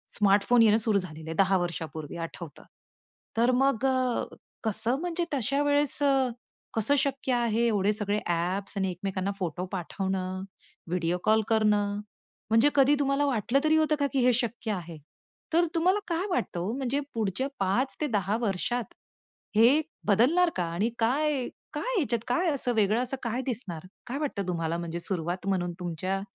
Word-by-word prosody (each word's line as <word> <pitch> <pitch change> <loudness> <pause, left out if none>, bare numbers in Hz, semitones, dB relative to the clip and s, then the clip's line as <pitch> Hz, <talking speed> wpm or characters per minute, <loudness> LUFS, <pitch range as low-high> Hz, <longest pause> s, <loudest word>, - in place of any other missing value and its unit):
Smartphone 205 +4 +4
येणं 215 -1 +5
सुरू 220 -2 +1
झालेलं 160 -3 -8
आहे. 165 - -4
10 195 0 +4
वर्षांपूर्वी 165 -3 -4
आठवतं. 165 -1 -7 0.7
तर 240 +2 +4
मग 270 -2 +2
अ, 255 -2 +1 0.4
कसं 225 +4 +1
म्हणजे 350 0 -1
तश्या 275 +1 +1
वेळेस 290 0 +2
अ, 270 -2 +3 0.5
कसं 225 +6 +2
शक्य 270 -1 0
आहे 235 -1 +1
एवढे 205 -2 +2
सगळे 205 -1 +1
ॲप्स 180 +4 -1
आणि 190 -1 0
एकमेकांना 190 +2 -3
फोटो 180 0 -3
पाठवणं, 185 +1 -3 0.5
व्हिडिओ 175 0 0
कॉल 220 +1 +4
करणं? 210 -2 +2 0.5
म्हणजे 225 +6 +5
कधी 280 +1 +5
तुम्हाला 275 +1 +2
वाटलं 255 0 +1
तरी 310 0 +4
होतं 310 -1 +3
का, 285 - +2
की 270 - +2
हे 250 - +5
शक्य 235 -1 -1
आहे? 170 -4 -6 0.6
तर 340 +1 +4
तुम्हाला 365 +5 +3
काय 345 +2 -1
वाटतं 265 - -1
ओ, 190 +5 -2
म्हणजे 270 +1 0 0.2
पुढच्या 220 +3 -1
5-10 210 - 0
वर्षात 220 +2 -2 0.6
हे 240 +8 +6 0.3
बदलणार 270 - +4
का? 175 - 0
आणि 200 +7 +1
काय 270 +3 +1 0.3
काय - - -2
ह्याच्यात 260 -9 +1
काय 335 +9 +1
असं 265 -3 0
वेगळं 215 +2 +3
असं 255 +2 -1
काय 235 +1 -1
दिसणार? 195 -10 -4 0.2
काय 255 - -3
वाटतं 225 -11 -3
तुम्हाला 165 -2 -1
म्हणजे 170 0 -4
सुरुवात 175 +1 -3
म्हणून 175 -3 0
तुमच्या 180 +2 -2
220 Hz, 155 wpm, -28 LUFS, 185-270 Hz, 0.7 s, हे